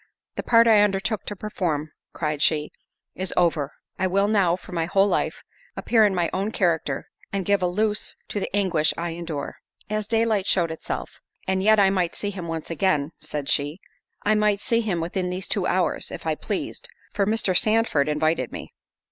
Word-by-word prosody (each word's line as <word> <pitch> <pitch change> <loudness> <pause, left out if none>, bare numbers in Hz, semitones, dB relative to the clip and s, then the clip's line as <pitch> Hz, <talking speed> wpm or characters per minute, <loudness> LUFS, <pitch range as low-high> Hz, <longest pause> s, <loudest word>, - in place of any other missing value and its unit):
"The - - -2
part 230 -1 +5
I 220 -3 +6
undertook 205 +1 0
to 205 - -3
perform," 170 -7 -2 0.2
cried 150 -2 -2
she, 150 -1 +2 0.4
"is 185 0 -4
over—I 170 +2 0
will 200 +2 +2
now, 195 -5 +3
for 185 - -13
my 165 -2 -1
whole 195 +3 +4
life, - - -1 0.3
appear 225 -2 +4
in 200 -2 +1
my 175 -1 +1
own 195 +3 0
character, 165 -9 0 0.3
and 195 -2 -2
give 200 0 +2
a 180 - +2
loose 210 +4 -1
to 205 - -2
the - - -3
anguish 180 -6 +2
I 170 +1 -2
endure." 165 -4 -5 0.3
As 215 -1 -1
daylight 225 -3 +1
showed 170 -3 +2
itself—"And 190 +3 -5
yet 215 +2 +5
I 195 -1 +5
might 180 -3 0
see 205 - -2
him 185 -4 -6
once 165 0 -4
again," 160 -3 +1
said 150 -2 -5
she—"I 150 +7 -2
might 210 -1 +2
see 230 +2 +2
him 190 -7 -1
within 180 +2 -2
these 180 +1 -4
two - - 0
hours, - - 0
if - - -8
I - - +1
pleased, 485 - -4 0.2
for 200 -1 +1
Mr. 215 -4 +1
Sandford 215 -9 +3
invited 150 -3 0
me." - - -8
185 Hz, 180 wpm, -24 LUFS, 165-210 Hz, 0.4 s, I